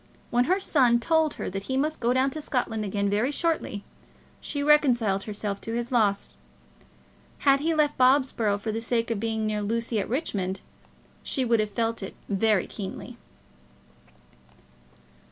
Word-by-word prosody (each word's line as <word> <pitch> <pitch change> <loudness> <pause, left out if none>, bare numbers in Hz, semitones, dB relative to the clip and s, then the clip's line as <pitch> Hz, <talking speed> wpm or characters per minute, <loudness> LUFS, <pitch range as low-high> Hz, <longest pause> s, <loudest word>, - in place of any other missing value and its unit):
When 245 +1 +3
her 370 +6 +2
son 255 -10 +3
told 320 +4 +1
her - - -5
that 195 +1 -5
he 260 - -2
must 305 +3 -1
go 235 0 +1
down 260 +2 +2
to 310 - -6
Scotland 235 -6 -2
again 200 0 -1
very 210 +6 +1
shortly, 295 - -1 0.6
she 285 -1 -3
reconciled 245 -10 +3
herself 205 -1 -4
to 225 - -4
his 240 +1 -3
loss. 210 -5 +1 1.1
Had 275 0 +5
he 320 +3 0
left 300 -2 +1
Bobsborough 255 -5 +3
for 220 +2 -3
the 225 +1 -3
sake 230 0 0
of 225 - -1
being 220 0 -1
near 210 -1 -1
Lucy 230 +2 -1
at 195 - -3
Richmond, 195 - -2 0.6
she 265 -3 0
would 230 -1 +2
have 215 0 0
felt 225 +2 -2
it 195 - -7
very 205 -1 +2
keenly. 195 -3 -8
230 Hz, 160 wpm, -26 LUFS, 210-270 Hz, 1.1 s, Had